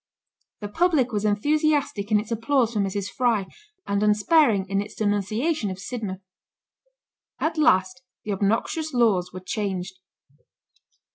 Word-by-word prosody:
The 205 - -4
public 295 - +1
was 210 -1 -1
enthusiastic 285 0 +1
in 210 - +5
its 215 +2 -7
applause 230 +1 +1
for 215 - -1
Mrs. 200 0 -1
Fry, 235 -6 +1 0.4
and 200 0 -1
unsparing 210 - +3
in 195 +1 0
its 210 +1 -9
denunciation 215 - -1
of 185 - -5
Sidmouth. 200 -2 -6 1.2
At 315 +1 -1
last 250 -4 +3 0.2
the 210 - -4
obnoxious 225 - -1
laws 195 -7 +2
were 185 - -8
changed. 190 -1 -4
210 Hz, 130 wpm, -24 LUFS, 200-255 Hz, 1.2 s, in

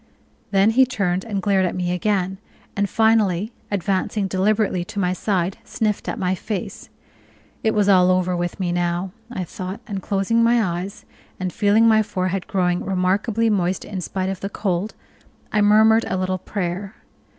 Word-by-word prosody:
Then 195 +2 +4
he 260 +4 +5
turned 195 -7 -1
and 205 -4 -3
glared 195 -1 +3
at 180 - -1
me 180 -1 -1
again, 190 0 -1 0.4
and 200 0 0
finally, 220 -2 +2 0.2
advancing 200 +1 -1
deliberately 195 -1 +1
to 175 - -11
my 180 -2 +1
side, 185 -1 -1
sniffed 210 -2 -2
at - - -3
my 185 0 0
face. 195 +1 -5 0.7
It 220 - +1
was 205 -1 +2
all 185 -2 +5
over 185 0 +2
with 175 +2 -3
me 180 -2 -1
now, 175 +1 -1 0.2
I 190 -6 -3
thought, 185 +4 -6
and 200 -4 -4
closing 200 +5 +1
my 225 -7 +2
eyes, 195 +2 -8 0.3
and 185 -1 -3
feeling 215 +2 +4
my 220 -1 +5
forehead 190 -3 -2
growing 180 -2 0
remarkably 195 +4 +1
moist 190 -4 0
in 195 -3 -5
spite 185 +2 -3
of 190 -1 -4
the 195 - -4
cold, 200 0 -2 0.6
I 210 - +2
murmured 220 +2 +5
a - - -1
little 185 0 -1
prayer. 190 0 -4
195 Hz, 170 wpm, -22 LUFS, 185-210 Hz, 0.7 s, he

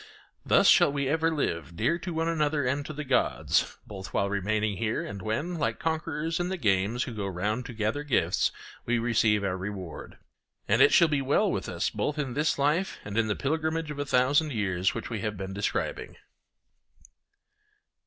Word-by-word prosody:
Thus - - +4
shall - - +6
we 140 +1 0
live 145 - -1
dear 170 - +1
to 180 - -5
one 165 0 -1
another 150 -3 +1
and 140 +3 0
to - - -5
the 150 0 -5
gods, 130 -3 +1
both 95 -2 -8
while 100 0 +1
remaining 105 +1 0
here 110 +3 -1
and 100 -1 -7
when, 150 - -2
like 145 - 0
conquerors 160 0 -2
in 175 0 -1
the 190 - -2
games 105 - +1
who 125 - -6
go 105 -3 -3
round 105 +6 -2
to - - -8
gather 110 +5 -1
gifts, 145 -3 +1 0.4
we 120 0 +2
receive 110 -3 +2
our 95 -2 0
reward. 95 -2 -7 0.5
And - - +3
it - - +7
shall 170 - +6
be 145 -3 0
well 135 +2 +2
with - - -3
us - - -1
both 150 - -2
in 135 -4 -2
this 150 +4 +1
life 150 +7 +1
and 100 0 -6
in 115 0 +2
the 105 - 0
pilgrimage 160 +2 -1
of 145 - -7
a 145 - -1
thousand 140 +4 +3
years 95 -4 0
which - - -5
we 115 - -2
have 105 -2 -3
been 95 0 -5
describing. 100 +1 -3
125 Hz, 190 wpm, -28 LUFS, 105-150 Hz, 0.5 s, it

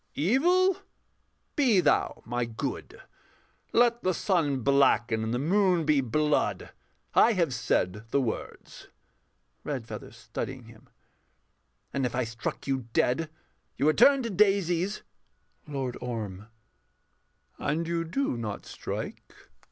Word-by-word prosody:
Evil, 350 - +3 0.8
be 250 -9 +4
thou 180 - +1
my 120 +1 -1
good; 115 -1 -5 0.7
Let 235 0 +3
the 185 -1 0
sun 155 -8 +1
blacken 120 -4 +3
and 110 - -2
the 120 - 0
moon 180 +3 +2
be 150 -2 +3
blood: 150 +5 0 0.4
I 235 - +5
have 170 -9 +1
said 115 -2 -1
the 140 - +2
words. 120 -5 -5 0.8
REDFEATHER - - -5
[studying - - -6
him]. - - -17 1.0
And 140 - -1
if 125 -2 -1
I 125 - +1
struck 115 +1 -5
you 130 -3 -2
dead, 155 +6 +1 0.5
You 140 - +1
would 155 -1 +3
turn 275 -2 +6
to 230 - -3
daisies! 195 -1 +2 0.6
LORD 135 -4 -3
ORM. 105 -5 -5 1.1
And 165 +3 -1
you 170 0 -1
do 175 - -1
not 110 -3 -5
strike. - - -6
150 Hz, 120 wpm, -28 LUFS, 120-190 Hz, 1.1 s, turn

